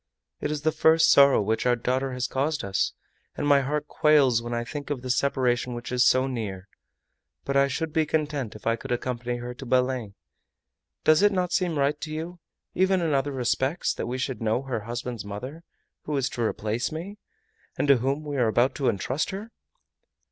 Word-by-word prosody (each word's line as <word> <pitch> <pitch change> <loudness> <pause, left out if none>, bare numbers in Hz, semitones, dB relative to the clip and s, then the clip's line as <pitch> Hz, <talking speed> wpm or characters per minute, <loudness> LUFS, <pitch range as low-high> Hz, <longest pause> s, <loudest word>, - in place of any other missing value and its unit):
It - - -2
is 150 -1 -3
the 155 - +3
first 160 +1 +4
sorrow 140 -5 +6
which 110 +4 0
our 120 - +4
daughter 130 +2 -1
has 125 0 -2
caused 145 +4 -1
us, 100 -1 0 0.4
and - - -3
my 140 -1 +5
heart 150 +2 -2
quails 140 -8 +4
when 120 0 -6
I 120 0 -1
think 145 +3 -7
of 135 -4 -3
the 130 - -1
separation 125 -2 0
which 120 +1 -7
is 125 0 +3
so 130 0 +4
near! 105 -7 -5 0.8
But 140 - -2
I 140 0 +5
should 155 +3 -3
be 160 -1 +2
content 150 -8 -2
if 105 - -12
I 115 0 +2
could 115 - -8
accompany 120 0 -2
her 120 +1 -6
to 125 - -10
Belem! 125 -4 0 0.9
Does 155 +3 +5
it 205 0 +5
not 180 -2 -1
seem 175 -4 0
right 145 +1 +1
to 155 - -5
you, 165 +3 -5 0.3
even 190 0 +2
in 165 -3 0
other 140 +1 +1
respects 130 +5 0
that - - -4
we 125 +1 -3
should 130 -1 -3
know 110 +4 0
her 130 -4 -3
husband's 120 -2 -5
mother, 125 +10 -7 0.4
who 150 -1 -1
is 135 -1 0
to 120 - -5
replace 110 +2 -1
me, 185 +7 -7 0.6
and - - 0
to 140 -2 +6
whom 135 +5 -1
we 145 -2 -4
are 120 -3 +3
about 120 +4 +2
to 135 -3 +2
entrust 130 +9 -1
her? 205 +4 -6
135 Hz, 205 wpm, -26 LUFS, 120-150 Hz, 0.9 s, sorrow